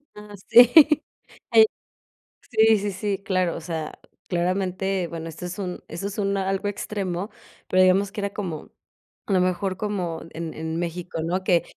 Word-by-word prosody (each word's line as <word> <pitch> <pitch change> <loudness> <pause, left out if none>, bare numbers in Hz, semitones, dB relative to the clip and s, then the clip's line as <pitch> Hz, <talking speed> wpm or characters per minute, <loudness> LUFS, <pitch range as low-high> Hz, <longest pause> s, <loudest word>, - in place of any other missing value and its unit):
Ah, 210 0 -11
sí. 240 +1 +8 0.8
Hay 225 -1 +8 0.9
sí, 220 -1 +5
sí, 205 0 -2
sí, 195 +1 -3
claro, 185 -3 0
o - - -8
sea, 160 -2 -4 0.3
claramente 185 +1 -1
Bueno, 165 -1 -6
esto 170 +3 -8
es 180 - -7
un 185 -3 -5
eso 170 +5 -6
es 200 - -7
un 200 -1 0
algo 195 +1 -1
extremo, 200 -2 -3
¿no? 205 - -5 0.4
pero 185 0 +3
digamos 190 +2 +4
que 210 - -5
era 200 0 -3
como, 175 -7 -5 0.5
a 200 - -1
lo 185 - +4
mejor 185 +1 -1
como 185 -6 -3
en 165 -1 -6
en 160 +1 -4
México, 170 -1 -4
¿no? 185 +3 -1
Que 175 -3 +2
185 Hz, 175 wpm, -24 LUFS, 175-200 Hz, 0.9 s, sí